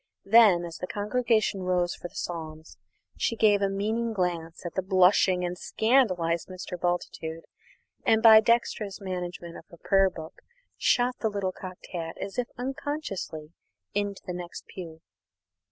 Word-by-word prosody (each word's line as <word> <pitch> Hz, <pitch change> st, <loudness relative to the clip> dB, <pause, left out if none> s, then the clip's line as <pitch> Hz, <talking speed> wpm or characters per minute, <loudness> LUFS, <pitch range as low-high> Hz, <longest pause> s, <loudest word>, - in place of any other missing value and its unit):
Then, 200 Hz, -5 st, +6 dB
as 170 Hz, -1 st, -7 dB
the 180 Hz, -, -4 dB
congregation 215 Hz, -1 st, 0 dB
rose 180 Hz, -1 st, +1 dB
for -, -, -7 dB
the -, -, -22 dB
Psalms, 160 Hz, -2 st, -6 dB, 0.4 s
she 230 Hz, -, 0 dB
gave 210 Hz, -2 st, +4 dB
a 200 Hz, -, +2 dB
meaning 220 Hz, +4 st, -1 dB
glance 175 Hz, -4 st, -3 dB
at 175 Hz, -, -4 dB
the 190 Hz, -, 0 dB
blushing 185 Hz, -1 st, +4 dB
and 175 Hz, 0 st, -3 dB
scandalised 185 Hz, -7 st, +1 dB
Mr. 185 Hz, -1 st, -7 dB
Bultitude 170 Hz, -2 st, -3 dB, 0.6 s
and 220 Hz, 0 st, +3 dB
by 220 Hz, -1 st, +10 dB
dexterous 220 Hz, -3 st, 0 dB
management 180 Hz, -3 st, -5 dB
of -, -, -13 dB
her 170 Hz, -, -14 dB
prayer 195 Hz, +2 st, +3 dB
book 160 Hz, -2 st, -10 dB, 0.4 s
shot 250 Hz, +1 st, +1 dB
the 220 Hz, -, 0 dB
little 200 Hz, -2 st, -2 dB
cocked 185 Hz, 0 st, -10 dB
hat, 165 Hz, -2 st, -4 dB
as 195 Hz, +4 st, -4 dB
if 245 Hz, -, -1 dB
unconsciously, 245 Hz, -, -5 dB, 0.4 s
into 205 Hz, -1 st, -2 dB
the 180 Hz, -, -4 dB
next 175 Hz, -1 st, -7 dB
pew. 165 Hz, -3 st, -9 dB
185 Hz, 155 wpm, -27 LUFS, 175-215 Hz, 0.6 s, by